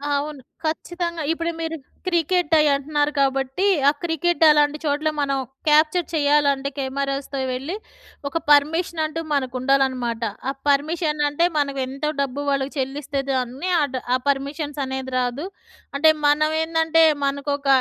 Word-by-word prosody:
అవును. 290 0 -3 0.2
ఖచ్చితంగా 340 +1 -3
ఇప్పుడు 335 +1 -1
మీరు 325 0 -3 0.3
క్రికెట్ 345 -1 +1
అయ్యి 300 -1 +4
అంటున్నారు. 295 +1 0
కాబట్టి 270 +5 0 0.2
ఆ - - +4
క్రికెట్ 345 +1 +1
అలాంటి 295 0 +4
చోట్ల 295 +2 +1
మనం 275 -1 0 0.3
క్యాప్చర్ 310 +3 +4
చేయాలంటే 285 -2 +2
కెమెరాస్‌తో 275 0 -3
వెళ్ళి, 275 +9 -4 0.5
ఒక 305 +4 -2
పర్మిషన్ 320 +3 +3
అంటూ 325 +1 -4
మనకు 260 -2 -1
ఉండాలనమాట. 255 -3 +1 0.3
ఆ - - +1 0.2
పర్మిషన్ 300 +1 +1
అంటే 315 +4 +1
మనకు 280 -2 0
ఎంతో 275 +3 -3
డబ్బు 275 +1 -2
వాళ్ళకి 275 0 -1
చెల్లిస్తే 275 +1 -2
దాన్ని, 260 +6 -2
ఆ - - +3
డ్ 255 - -1 0.3
పర్మిషన్స్ 285 +2 -2
అనేది 265 0 -5
రాదు. 250 +6 -2 0.5
అంటే 315 +2 +6 0.2
మనం 305 +1 +3
ఏందంటే 325 0 +3 0.2
మనకొక 280 0 -2
290 Hz, 135 wpm, -22 LUFS, 275-315 Hz, 0.5 s, అంటే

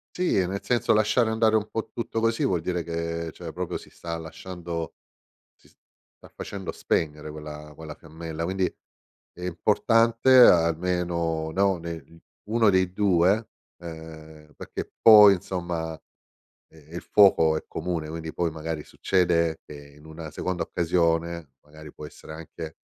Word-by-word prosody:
Sì, 180 - +1
e 90 - +1
nel 100 +2 -4
senso 120 -3 +1
lasciare 110 +2 +2
andare 110 0 +2
un 110 -1 0
po' 115 - -4
tutto 115 -1 -3
così 115 0 +1
vuol 90 -3 +1
dire 90 +1 -2
che, 85 0 -4
cioè, 85 -2 -8
proprio 90 -1 -4
si - - -15
sta 85 -1 -6
lasciando 85 0 -7 0.6
si - - -26
sta - - -24
facendo 95 -3 -6
spegnere 75 -1 -2
quella 75 0 -9
quella 80 -1 -9
fiammella, 80 +1 -8
quindi 95 +2 0 0.7
è 90 - -13
importante 115 +7 +3
almeno, 85 -4 +3
no, 95 0 +2
nel 85 -1 -9 0.3
uno 110 -1 +3
dei 95 -1 +1
2, 100 +2 +2 0.3
uhm, 80 -2 -11
perché - - -7
poi, 105 -3 +9
insomma, 85 -4 -4 0.7
eh, 80 +1 -16
il - - -4
fuoco 80 -6 +4
è - - -6
comune, 85 -4 -4
quindi 80 0 -6
poi 85 -2 -1
magari 80 -1 -5
succede 85 -3 0
che - - -11 0.2
in 75 - -18
una 80 0 -9
seconda 90 +3 -3
occasione, 85 -3 -1
magari 75 0 -14
può 75 - -9
essere 80 +1 -11
anche 80 0 -9
85 Hz, 145 wpm, -25 LUFS, 80-95 Hz, 0.7 s, poi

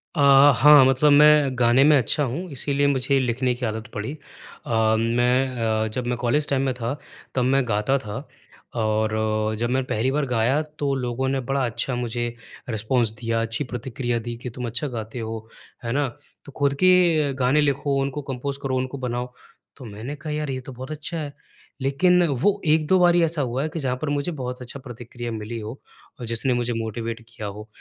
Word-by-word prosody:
अ, - - -3 0.4
हाँ 145 +2 +8
मतलब 135 +3 +4
मैं 145 -2 +5
गाने 120 +2 +5
में 150 0 +6
अच्छा 140 +4 +1
हूँ 165 +9 -4
इसीलिए 140 +1 +1
मुझे 135 0 +2
लिखने 125 0 0
की 125 0 -4
आदत 110 +2 -4
पड़ी। 110 +5 -4 0.5
अ, 110 -1 +2
मैं 125 +3 +1 0.3
अ, - - -1
जब 125 +1 -2
मैं 120 -1 -1
कॉलेज 145 +5 +1
टाइम 135 -2 +1
में 130 - 0
था 120 +3 -3 0.4
तब 130 - +2
मैं 130 0 +2
गाता 110 +6 +1
था 105 -5 -7 0.5
और 110 -1 +1 0.5
जब 120 +1 0
मैं 130 +1 +1
पहली 115 +3 0
बार 145 +1 0
गाया 125 +3 +1 0.2
तो 140 -1 0
लोगों 125 0 -2
ने 135 - 0
बड़ा 135 +1 -1
अच्छा 120 +2 -2
मुझे 120 0 -2 0.4
रिस्पॉन्स 110 +1 0
दिया, 115 -1 -1
अच्छी 115 +5 -2
प्रतिक्रिया 120 -1 -3
दी 120 +1 -6
कि 125 +1 -6
तुम 125 +1 -6
अच्छा 125 +6 -2
गाते 115 -1 -6
हो। 110 0 -6 0.4
है 115 - -3
ना? 140 +1 +1 0.4
तो 140 - -11
खुद 140 -1 +2
के 170 -6 +4
गाने 130 +3 +2
लिखो 140 -1 0
उनको 140 +2 -3
कम्पोज 135 0 -4
करो 130 -1 -1
उनको 130 +2 -3
बनाओ, 125 -1 -4 0.4
तो 130 - -10
मैंने 110 +7 -7
कहा, 150 +1 -6
"यार 150 -1 -3
ये 130 -1 -3
तो 130 - -10
बहुत 130 +3 -8
अच्छा 155 +2 -4
है।" 145 -2 -5 0.5
लेकिन 175 +7 +3
वो 165 +9 +1
1-2 155 +4 +3
बार 175 -1 +5
ही 175 - +4
ऐसा 160 -2 0
हुआ 130 +2 -1
है 155 - -2
कि 165 - -5
जहाँ 130 -3 -1
पर 155 - -2
मुझे 145 +4 -1
बहुत 125 0 -5
अच्छा 125 +3 -5
प्रतिक्रिया 120 -1 -7
मिली 110 +1 -5
हो 110 +5 -7 0.4
और 120 - -5
जिसने 115 +3 0
मुझे 120 0 -1
मोटिवेट 115 +1 -4
किया 115 -3 -7
हो। 105 +2 -8
130 Hz, 200 wpm, -23 LUFS, 120-140 Hz, 0.5 s, हाँ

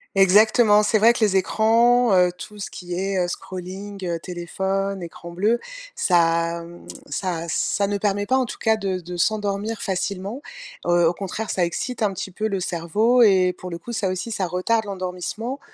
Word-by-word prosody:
Exactement, 210 +2 +5
c'est 215 +1 +2
vrai 230 +3 +6
que - - -5
les 200 -2 +3
écrans, 230 +3 +3
heu, 180 0 +4
tout 210 +3 -10
ce 205 - -6
qui 175 -1 -6
est, 195 +1 -1
heu, - - -1
scrolling, 190 +3 -7
heu, 170 -1 -2
téléphone, 190 +2 -3
écran 170 0 -9
bleu, 210 +7 +1 0.3
ça, 170 -1 +2
hem, 170 +1 -13 0.2
ça 175 -9 -3
ça 200 +4 0
ne 200 0 -2
permet 205 0 0
pas, 260 - +1
en 260 -1 +2
tout - - -7
cas, 220 -1 +2
de 195 -3 -2
de 175 +1 -7
s'endormir 210 +2 -1
facilement. 195 +5 -3 0.5
Heu, 175 -1 +4
au 170 - +2
contraire, 200 +4 -4
ça 185 - +1
excite 230 +8 -3
un 210 -2 +2
petit 190 0 -6
peu 215 +4 -2
le 195 -2 -2
cerveau 205 +9 +1
et 185 -4 +5
pour 180 - -8
le 170 - -5
coup, 205 +8 -9
ça 200 -4 0
aussi, 185 +5 -4
ça 190 -4 -1
retarde 210 +6 0
l'endormissement, 195 +7 -4
195 Hz, 190 wpm, -23 LUFS, 180-215 Hz, 0.5 s, vrai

